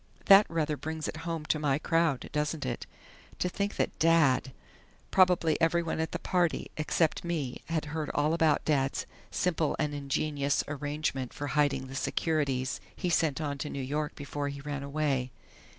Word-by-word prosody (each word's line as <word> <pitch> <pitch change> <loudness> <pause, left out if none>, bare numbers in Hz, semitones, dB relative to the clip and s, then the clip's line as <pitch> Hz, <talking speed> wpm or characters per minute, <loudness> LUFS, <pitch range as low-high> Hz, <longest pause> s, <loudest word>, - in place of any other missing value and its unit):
"That 195 +1 +8
rather 155 -2 0
brings 160 0 -4
it - - -4
home 165 -2 -3
to 155 - +1
my 140 -2 +2
crowd 165 -3 +1
doesn't 150 -1 -1
it?... 120 -2 -4 0.5
To - - 0
think 200 +3 -2
that - - -1
Dad!... 150 -6 +4 0.6
Probably 180 -4 +4
everyone 165 0 +1
at 160 - -1
the - - -2
party 175 -3 0
except 155 +1 +1
me 155 -7 -3
had 165 -2 -1
heard 155 -2 -2
all 150 +2 +2
about 160 -3 +2
Dad's 135 -3 +1 0.2
'simple 165 -4 0
and 150 -1 -1
ingenious' 140 0 0
arrangement 145 -3 -2
for 145 - -4
hiding 145 -3 +2
the 130 - -9
securities 140 -2 0
he 180 -3 -2
sent 160 -4 +2
on 145 -3 -3
to 150 - -3
New 140 - -5
York 145 +3 -2
before 145 0 -4
he 140 0 -6
ran 145 -1 -4
away.... 140 -3 -1
150 Hz, 165 wpm, -30 LUFS, 140-165 Hz, 0.6 s, That